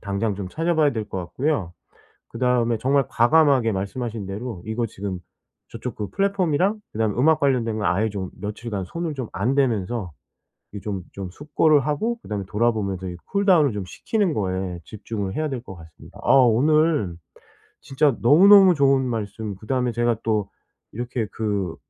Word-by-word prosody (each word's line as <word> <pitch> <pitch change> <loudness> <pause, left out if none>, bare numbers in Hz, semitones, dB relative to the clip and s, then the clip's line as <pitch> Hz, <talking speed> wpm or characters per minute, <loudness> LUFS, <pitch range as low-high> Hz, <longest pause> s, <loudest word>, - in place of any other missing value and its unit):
당장 100 +1 -2
좀 95 -1 -6
찾아 165 - -1
봐야 155 -2 +3
될 110 -5 -3
것 - - -4
같고요. 95 - -2 0.6
그다음에 120 -2 +1
정말 135 +3 +2
과감하게 130 -2 +4
말씀하신 105 +3 -4
대로 100 -1 -6
이거 110 +2 -2
지금 100 -3 -5 0.5
저쪽 115 0 -6
그 105 - -4
플랫폼이랑 195 0 +1
그다음에 110 -1 0
음악 155 +5 +4
관련된 120 -6 +1
거 105 - -2
아예 95 +6 +1
좀 95 -3 -5
며칠간 105 -1 -5
손을 165 - -4
좀 130 -4 -4
안 110 +8 0
대면서 115 -7 0 0.6
이 105 - -6
좀 100 -3 -4
좀 95 -2 -6
숙고를 145 - +2
하고 150 - -1
그다음에 105 -2 -4
돌아 115 +4 +2
보면서 100 -4 -3
이 90 - -6
쿨 200 0 -1
다운을 165 -8 +5
좀 100 -3 -4
식히는 200 - -1
거에 95 -4 -2
집중을 100 +1 -5
해야 155 0 -1
될 130 -3 -4
것 95 -5 -10
같습니다. 80 -2 -15
아 - - +4
오늘 135 - +3 0.7
진짜 135 -1 +1
너무너무 190 - +7
좋은 135 -2 +3
말씀 110 -3 -4
그다음에 125 +4 -1
제가 120 0 +1
또 105 -3 0 0.4
이렇게 120 0 -3
그 100 -6 -2
115 Hz, 345 characters per minute, -23 LUFS, 100-145 Hz, 0.7 s, 너무너무